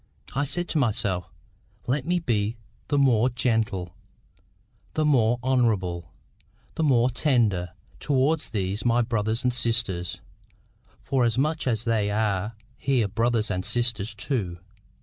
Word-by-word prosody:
I 140 Hz, +2 st, +1 dB
said 175 Hz, +6 st, -1 dB
to 160 Hz, -, +1 dB
myself, 100 Hz, -8 st, 0 dB, 0.6 s
"Let 135 Hz, +4 st, -1 dB
me 180 Hz, +1 st, +2 dB
be 115 Hz, -8 st, 0 dB, 0.3 s
the 145 Hz, -, +1 dB
more 125 Hz, -3 st, +4 dB
gentle, 110 Hz, -7 st, -1 dB, 1.0 s
the 155 Hz, -, +2 dB
more 120 Hz, -5 st, +3 dB
honourable, 105 Hz, -10 st, +1 dB, 0.6 s
the -, -, -3 dB
more 130 Hz, -5 st, +4 dB
tender, 115 Hz, -, +1 dB, 0.3 s
towards 145 Hz, +3 st, +1 dB
these 100 Hz, -1 st, -2 dB
my 120 Hz, 0 st, +3 dB
brothers 115 Hz, +1 st, -1 dB
and 125 Hz, -1 st, +2 dB
sisters, 115 Hz, -8 st, -1 dB, 0.8 s
forasmuch 135 Hz, +4 st, +1 dB
as 115 Hz, -3 st, 0 dB
they 110 Hz, -3 st, +1 dB
are 105 Hz, 0 st, 0 dB, 0.3 s
her 125 Hz, -6 st, +3 dB
brothers 115 Hz, +1 st, 0 dB
and 90 Hz, -1 st, -1 dB
sisters 115 Hz, -3 st, -1 dB
too." 105 Hz, -7 st, -2 dB
115 Hz, 125 wpm, -26 LUFS, 105-130 Hz, 1.0 s, more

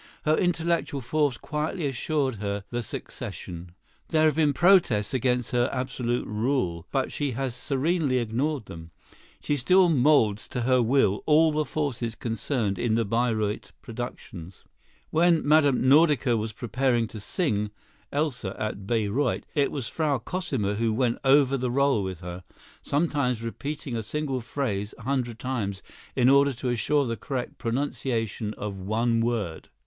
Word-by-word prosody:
Her 155 Hz, 0 st, +4 dB
intellectual 170 Hz, -4 st, 0 dB
force 140 Hz, +1 st, 0 dB
quietly 155 Hz, +3 st, -3 dB
assured 135 Hz, -1 st, -1 dB
her 100 Hz, 0 st, -3 dB
the 120 Hz, 0 st, -1 dB
succession. 90 Hz, -5 st, -7 dB, 0.3 s
There 155 Hz, -1 st, +2 dB
have 155 Hz, -, +4 dB
been 155 Hz, -2 st, +3 dB
protests 140 Hz, -, +4 dB
against 125 Hz, -1 st, 0 dB
her 120 Hz, 0 st, +2 dB
absolute 125 Hz, -2 st, -2 dB
rule, 105 Hz, -7 st, -1 dB
but 135 Hz, -2 st, 0 dB
she 145 Hz, -3 st, -2 dB
has 130 Hz, +1 st, -2 dB
serenely 140 Hz, +2 st, 0 dB
ignored 125 Hz, +3 st, -1 dB
them. 80 Hz, 0 st, -10 dB, 0.5 s
She 145 Hz, -, 0 dB
still 180 Hz, +7 st, +5 dB
moulds 125 Hz, -8 st, +3 dB
to 125 Hz, -, -3 dB
her 130 Hz, +1 st, +3 dB
will 115 Hz, -4 st, +2 dB
all 155 Hz, +1 st, +5 dB
the 155 Hz, 0 st, 0 dB
forces 120 Hz, -5 st, -2 dB
concerned 115 Hz, -3 st, -2 dB
in 115 Hz, -2 st, +1 dB
the 115 Hz, 0 st, +1 dB
Bayreuth 110 Hz, -1 st, -1 dB
productions. 100 Hz, -7 st, -8 dB, 0.5 s
When 170 Hz, 0 st, +4 dB
Mme. 150 Hz, -2 st, +5 dB
Nordica 145 Hz, -4 st, +5 dB
was 110 Hz, 0 st, -2 dB
preparing 120 Hz, +1 st, 0 dB
to 110 Hz, -, -8 dB
sing 105 Hz, -, -1 dB, 0.4 s
"Elsa" 135 Hz, -9 st, -1 dB
at 100 Hz, -2 st, -4 dB
Bayreuth, 115 Hz, +4 st, 0 dB
it 145 Hz, -2 st, +1 dB
was 135 Hz, -6 st, -3 dB
Frau 150 Hz, -4 st, 0 dB
Cosima 125 Hz, -, -2 dB
who 115 Hz, +2 st, 0 dB
went 120 Hz, +1 st, 0 dB
over 135 Hz, 0 st, +4 dB
the 125 Hz, -1 st, -1 dB
rôle 135 Hz, -4 st, +2 dB
with 95 Hz, -2 st, -5 dB
her, 90 Hz, 0 st, -7 dB, 0.4 s
sometimes 140 Hz, -6 st, 0 dB
repeating 140 Hz, +2 st, -5 dB
a 115 Hz, -, -1 dB
single 135 Hz, +3 st, -2 dB
phrase 110 Hz, -5 st, -3 dB
a -, -, -12 dB
hundred 125 Hz, -4 st, -1 dB
times 110 Hz, -7 st, -3 dB, 0.3 s
in 125 Hz, -2 st, +3 dB
order 140 Hz, +1 st, +5 dB
to 125 Hz, +1 st, -3 dB
assure 135 Hz, +5 st, +1 dB
the 115 Hz, -1 st, -2 dB
correct 130 Hz, 0 st, -5 dB
pronunciation 115 Hz, -4 st, -2 dB
of 100 Hz, -2 st, -5 dB
one 115 Hz, +4 st, 0 dB
word. 115 Hz, -8 st, -2 dB
125 Hz, 150 wpm, -26 LUFS, 110-145 Hz, 0.5 s, still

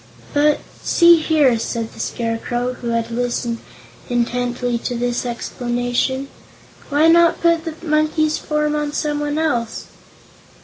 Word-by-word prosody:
"But 295 Hz, +1 st, +3 dB, 0.2 s
see 340 Hz, -1 st, +6 dB
here," 300 Hz, -7 st, +3 dB
said 230 Hz, 0 st, -3 dB
the -, -, -14 dB
Scarecrow, 240 Hz, +2 st, -2 dB
who 245 Hz, -, -8 dB
had 230 Hz, 0 st, -1 dB
listened 240 Hz, -1 st, -2 dB, 0.5 s
intently 245 Hz, 0 st, -1 dB
to 245 Hz, -, -3 dB
this 245 Hz, +1 st, -1 dB
explanation, 245 Hz, +2 st, -2 dB, 0.6 s
"why 295 Hz, +3 st, +4 dB
not 335 Hz, 0 st, +5 dB
put 335 Hz, -1 st, +2 dB
the 325 Hz, -2 st, -4 dB
monkey's 310 Hz, 0 st, +1 dB
form 300 Hz, 0 st, -1 dB
on 295 Hz, -1 st, -2 dB
some 295 Hz, -1 st, -1 dB
one 295 Hz, 0 st, -2 dB
else?" 240 Hz, -8 st, -1 dB
255 Hz, 130 wpm, -20 LUFS, 240-305 Hz, 0.6 s, see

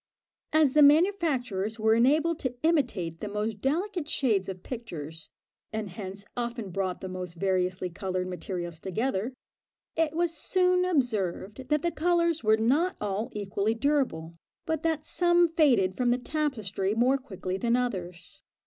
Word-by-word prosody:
As 310 Hz, -4 st, +4 dB
the 300 Hz, -, +5 dB
manufacturers 285 Hz, -, +3 dB
were 220 Hz, 0 st, +3 dB
enabled 300 Hz, +8 st, +3 dB
to 255 Hz, -2 st, -3 dB
imitate 240 Hz, -, +1 dB
the 210 Hz, -, -4 dB
most 210 Hz, 0 st, -3 dB
delicate 340 Hz, +3 st, -1 dB
shades 210 Hz, -11 st, +1 dB
of 185 Hz, -1 st, -7 dB
pictures, 160 Hz, -, -7 dB, 0.4 s
and 215 Hz, -3 st, -4 dB
hence 195 Hz, +1 st, -7 dB
often 235 Hz, -4 st, -4 dB
brought 185 Hz, 0 st, -2 dB
the 190 Hz, -, -5 dB
most 180 Hz, -2 st, -6 dB
variously 185 Hz, 0 st, 0 dB
coloured 185 Hz, +1 st, -3 dB
materials 175 Hz, -2 st, -5 dB
together, 215 Hz, +4 st, -2 dB, 0.6 s
it 320 Hz, -2 st, +1 dB
was 340 Hz, 0 st, 0 dB
soon 365 Hz, +2 st, +2 dB
observed 245 Hz, -, -1 dB
that 300 Hz, -1 st, +1 dB
the 345 Hz, -, +1 dB
colours 335 Hz, -1 st, +1 dB
were 215 Hz, 0 st, +4 dB
not 285 Hz, +12 st, +2 dB
all 210 Hz, +3 st, -2 dB
equally 205 Hz, +1 st, -1 dB
durable, 230 Hz, -, 0 dB, 0.3 s
but 320 Hz, -2 st, -1 dB
that 320 Hz, -2 st, -1 dB
some 345 Hz, 0 st, +3 dB
faded 245 Hz, -, +3 dB
from 245 Hz, +2 st, +1 dB
the 245 Hz, -, +3 dB
tapestry 220 Hz, -9 st, -2 dB
more 255 Hz, +4 st, +3 dB
quickly 190 Hz, -7 st, -5 dB
than 235 Hz, +3 st, +1 dB
others. 180 Hz, -9 st, -4 dB
230 Hz, 150 wpm, -28 LUFS, 190-300 Hz, 0.6 s, the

